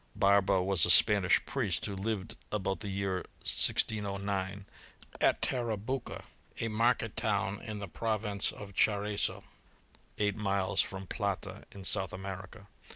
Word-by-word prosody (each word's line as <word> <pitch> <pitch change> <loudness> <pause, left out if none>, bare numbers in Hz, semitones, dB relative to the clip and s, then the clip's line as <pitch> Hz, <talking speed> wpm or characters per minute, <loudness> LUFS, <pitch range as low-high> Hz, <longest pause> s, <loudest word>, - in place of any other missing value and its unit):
Barba 100 -1 +3
was 95 -3 +3
a - - +4
Spanish 100 -3 +6
priest, 110 - 0
who 100 - -3
lived 100 0 -3 0.2
about 95 -2 -1
the 105 - -5
year 95 -1 -1 0.3
1609, 100 -2 -1 0.6
at - - +3
Tarabuco, 120 +1 -2 0.4
a 115 - -1
market 115 0 +1
town 100 0 -1
in 110 -1 -6
the 100 -1 -5
province 105 +2 0
of 100 -1 -10
Charcso, 105 +1 +1 0.7
eight 105 -1 +1
miles 100 -3 +1
from 95 0 -5
Plata, 100 -1 -4
in 100 - -10
South 95 -2 +2
America. 95 +2 -7
100 Hz, 130 wpm, -31 LUFS, 95-105 Hz, 0.7 s, Spanish